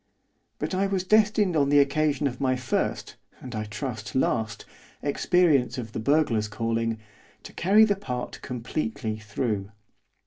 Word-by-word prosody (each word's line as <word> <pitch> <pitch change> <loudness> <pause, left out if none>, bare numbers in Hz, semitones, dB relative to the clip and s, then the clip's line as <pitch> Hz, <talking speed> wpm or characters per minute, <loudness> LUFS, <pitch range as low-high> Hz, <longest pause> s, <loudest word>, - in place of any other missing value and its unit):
But - - -3
I 195 +1 +1
was 195 -2 -1
destined 210 -2 +3
on 140 -2 +3
the 145 - +5
occasion 145 0 +2
of 125 -2 -2
my 130 -1 +2
first 130 0 -2 0.2
and, 125 -1 -9
I 110 -1 -3
trust, 105 -1 -5
last 115 -4 0 0.4
experience 145 -4 +2
of 115 -3 -5
the - - -4
burglar's 115 -4 +2
calling, 115 +1 -1 0.5
to - - -11
carry 205 +5 +5
the 205 -2 +1
part 125 -11 -5
completely 120 -2 -3
through. 105 -1 -3
130 Hz, 145 wpm, -26 LUFS, 115-155 Hz, 0.5 s, the